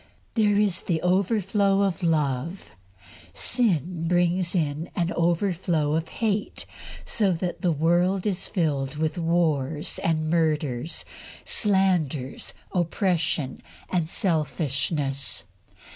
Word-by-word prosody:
There 210 -3 +3
is 205 -4 +1
an 170 - +2
overflow 195 +1 +2
of 195 -2 -1
love. 155 - -1 0.6
Sin 180 - +1
brings 175 +1 +2
in 155 0 -1
an 175 0 0
overflow 170 -3 +1
of 160 0 -1
hate, 215 -2 -2 0.4
so 205 -4 +2
that 175 +1 -3
the 175 - +2
world 175 +5 +2
is 195 -3 -1
filled 145 -6 -1
with 160 +3 -1
wars 160 -3 +1
and 155 -1 +1
murders, 155 -4 0 0.4
slanders, 180 - +1 0.2
oppression, 170 - 0 0.3
and 170 -3 0
selfishness. 145 - -1
170 Hz, 100 wpm, -25 LUFS, 155-185 Hz, 0.6 s, There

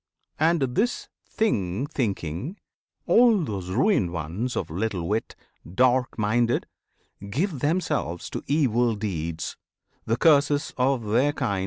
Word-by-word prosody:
And, 165 +1 +3
this 240 - 0 0.2
thing 105 - 0
thinking, 110 - -3 0.5
all 230 -6 +5
those 100 - -4
ruined 100 - +2
ones 90 - -3
Of 80 - -3
little 95 -1 -2
wit, 110 +2 -2 0.4
dark 130 +2 +2
minded 115 +3 +1 0.6
give 155 - -1
themselves 145 - -1
To - - -5
evil 120 -6 +2
deeds, 85 -6 -4 0.5
the 115 +1 +1
curses 145 0 +3
of 130 -2 +1
their 125 +8 +2
kind. 100 -8 -1
120 Hz, 120 wpm, -25 LUFS, 95-145 Hz, 0.6 s, all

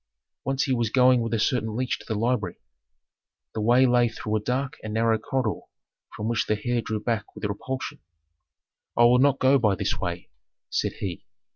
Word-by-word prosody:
Once 135 +2 0
he 135 - 0
was 120 -3 0
going 125 0 +5
with 115 - -2
a 115 - +1
certain 110 -1 0
leech 125 +1 -1
to - - -14
the 110 - -2
library. 115 -6 0 1.0
The 110 - -3
way 120 +4 +5
lay 120 -1 +4
through 110 -1 -3
a - - +2
dark 130 +5 -2
and 110 0 -5
narrow 115 0 +2
corridor 130 -2 -1 0.6
from 105 - -3
which 115 -1 0
the 105 0 0
heir 120 -1 +1
drew 110 0 -3
back 110 -1 -3
with - - -5
repulsion. 130 +6 -4 1.0
"I 120 - +6
will 120 +1 +6
not 140 0 +4
go 135 +1 +4
by 105 -5 +2
this - - -2
way," - - -4 0.4
said - - 0
he. 90 -4 -6
120 Hz, 190 wpm, -25 LUFS, 110-130 Hz, 1.0 s, I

